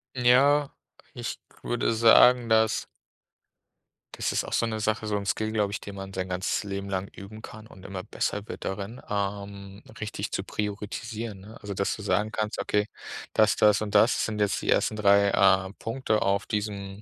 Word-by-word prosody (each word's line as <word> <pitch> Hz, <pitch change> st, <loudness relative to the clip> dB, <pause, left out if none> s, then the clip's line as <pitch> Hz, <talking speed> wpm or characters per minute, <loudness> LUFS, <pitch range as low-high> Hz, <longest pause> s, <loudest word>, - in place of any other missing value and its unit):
Ja, 135 Hz, +4 st, +4 dB, 0.4 s
ich -, -, -5 dB, 0.2 s
würde 120 Hz, -1 st, 0 dB
sagen: 115 Hz, +1 st, +6 dB
„Das 110 Hz, 0 st, +3 dB, 1.3 s
das -, -, -2 dB
ist -, -, 0 dB
auch -, -, -7 dB
so -, -, +2 dB
'ne 110 Hz, -1 st, -3 dB
Sache, 110 Hz, +1 st, -1 dB
so 105 Hz, -1 st, -1 dB
'n 100 Hz, -, -5 dB
Skill, 110 Hz, +2 st, -1 dB
glaube 105 Hz, -2 st, 0 dB
ich, -, -, -3 dB
den 100 Hz, -1 st, -8 dB
man 95 Hz, 0 st, -8 dB
sein 95 Hz, -1 st, -3 dB
ganzes 90 Hz, +3 st, -1 dB
Leben 100 Hz, -1 st, -5 dB
lang 95 Hz, 0 st, -2 dB
üben 105 Hz, +3 st, -11 dB
kann 110 Hz, 0 st, -11 dB
und 95 Hz, -4 st, -15 dB
immer 95 Hz, -2 st, -6 dB
besser 105 Hz, +3 st, -3 dB
wird -, -, -7 dB
darin, 100 Hz, +5 st, -5 dB
ähm, 100 Hz, 0 st, -4 dB, 0.2 s
richtig 105 Hz, -1 st, -4 dB
zu 95 Hz, -, -2 dB
priorisieren“, 105 Hz, +1 st, -5 dB
ne? 110 Hz, +4 st, -12 dB
Also 100 Hz, -1 st, -5 dB
dass 100 Hz, +1 st, -1 dB
du -, -, -9 dB
sagen 105 Hz, +1 st, 0 dB
kannst, 110 Hz, 0 st, -3 dB
„okay, 105 Hz, +1 st, 0 dB, 0.5 s
das, 110 Hz, -4 st, +4 dB
das 105 Hz, 0 st, +4 dB
und 105 Hz, -1 st, -4 dB
das 105 Hz, +3 st, +4 dB
sind 105 Hz, -1 st, -4 dB
jetzt 105 Hz, -1 st, +1 dB
die -, -, -4 dB
ersten 110 Hz, -, +2 dB
3, 100 Hz, -1 st, +4 dB
äh, 95 Hz, 0 st, +3 dB
Punkte 115 Hz, -2 st, -1 dB
auf 100 Hz, +1 st, +1 dB
diesem 100 Hz, -2 st, -4 dB
105 Hz, 185 wpm, -27 LUFS, 100-110 Hz, 1.3 s, sagen